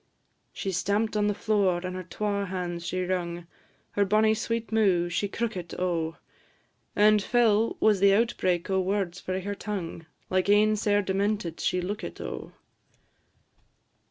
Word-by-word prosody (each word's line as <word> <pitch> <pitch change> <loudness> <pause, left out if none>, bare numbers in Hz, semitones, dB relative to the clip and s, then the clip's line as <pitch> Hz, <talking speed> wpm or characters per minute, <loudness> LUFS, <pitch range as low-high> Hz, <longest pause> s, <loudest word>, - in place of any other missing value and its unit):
She 195 - -4
stamp'd 200 +5 0
on 210 -1 +2
the 205 - 0
floor, 200 -5 +1
and 185 0 -4
her 185 - -4
twa 200 +2 -2
hands 175 -2 -4
she 185 0 -1
wrung, 175 -2 -3 0.5
Her 205 - +2
bonny 215 +2 +3
sweet 225 +1 -3
mou' 190 -6 +3
she 200 +4 -1
crookit, 190 -6 -4
O! 170 -3 -1 0.8
And 210 0 +5
fell 225 0 +2
was 215 -3 +4
the 200 0 +5
outbreak 185 -6 +1
o' 190 - +2
words 190 -1 -1
frae 185 0 -3
her 205 +2 -3
tongue; 180 -6 -5 0.2
Like 185 +1 0
ane 210 +1 +5
sair 205 -1 +1
demented 195 -3 -1
she 180 - 0
lookit, 205 +5 -5
O! - - -6
200 Hz, 150 wpm, -27 LUFS, 180-210 Hz, 0.8 s, And